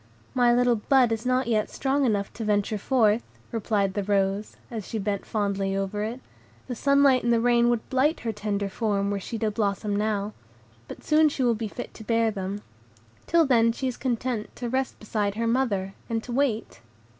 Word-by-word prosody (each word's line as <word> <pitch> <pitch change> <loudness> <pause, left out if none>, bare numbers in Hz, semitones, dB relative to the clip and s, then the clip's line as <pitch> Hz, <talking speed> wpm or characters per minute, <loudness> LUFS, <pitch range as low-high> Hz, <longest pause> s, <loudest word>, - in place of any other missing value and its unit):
"My 245 -1 +4
little 245 -1 +3
bud 255 +1 +3
is 225 +2 -2
not 255 +1 +2
yet 220 -2 +1
strong 275 +1 0
enough 205 -3 -1
to 225 - -6
venture 210 0 0
forth," 225 -1 +3 0.3
replied 205 -4 0
the 205 - -1
rose, 195 +1 0
as 220 -4 -5
she 225 - -3
bent 200 -1 -2
fondly 200 -2 -1
over 195 +1 -2
it; 235 +4 -4 0.4
"the 255 - -4
sunlight 280 0 +4
and 235 - +2
the 230 - +4
rain 240 0 +3
would 240 -2 -1
blight 280 +5 +2
her 230 - -2
tender 205 -1 -2
form, 200 -1 -1
were 200 - -1
she 225 +4 -5
to 220 -1 0
blossom 205 -1 -1
now, 210 0 -1 0.5
but - - -10
soon 305 0 +4
she 275 -2 -2
will 240 -1 +4
be 220 0 -3
fit 245 +4 -7
to 220 - -11
bear 230 0 +2
them; 200 0 -5 0.6
till 335 -1 +4
then 230 -4 +4
she 260 +3 -3
is 250 - -2
content 245 -3 -2
to 240 -1 -4
rest 260 +1 -1
beside 210 -2 -2
her 230 +1 -1
mother, 225 -6 0 0.2
and 225 -1 -1
to 245 - -8
wait." 235 - -1
225 Hz, 200 wpm, -26 LUFS, 205-245 Hz, 0.6 s, My